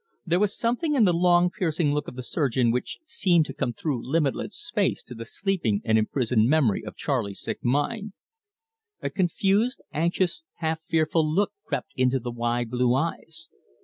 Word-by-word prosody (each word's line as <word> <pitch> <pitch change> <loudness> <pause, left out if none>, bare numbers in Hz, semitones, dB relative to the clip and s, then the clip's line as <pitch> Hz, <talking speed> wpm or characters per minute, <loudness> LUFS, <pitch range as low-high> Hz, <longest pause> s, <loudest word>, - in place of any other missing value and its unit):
There 175 0 +2
was 205 0 +1
something 250 +7 0
in 235 -6 +5
the 180 - +4
long, 175 +1 +4
piercing 160 -5 0
look 150 0 -1
of - - -7
the 130 - -6
surgeon 125 -4 +1
which 125 +1 -2
seemed 180 - +3
to 135 - -7
come 120 - -1
through 130 -1 -3
limitless 150 +6 -1
space 230 - -1
to 125 - -10
the 115 -1 -7
sleeping 180 - 0
and 110 - +3
imprisoned 115 0 +2
memory 135 -10 +3
of 105 - -8
Charley's 115 -9 -2
sick - - -5
mind. 195 - 0 0.9
A - - -1
confused, 195 +6 +1
anxious, 170 - 0
half 160 -1 -1
fearful 155 -1 +2
look 200 +6 +2 0.2
crept - - -3
into 130 +1 +2
the 120 0 -5
wide 120 0 -1
blue 125 0 +2
eyes. 165 +2 -3
155 Hz, 175 wpm, -26 LUFS, 125-180 Hz, 0.9 s, in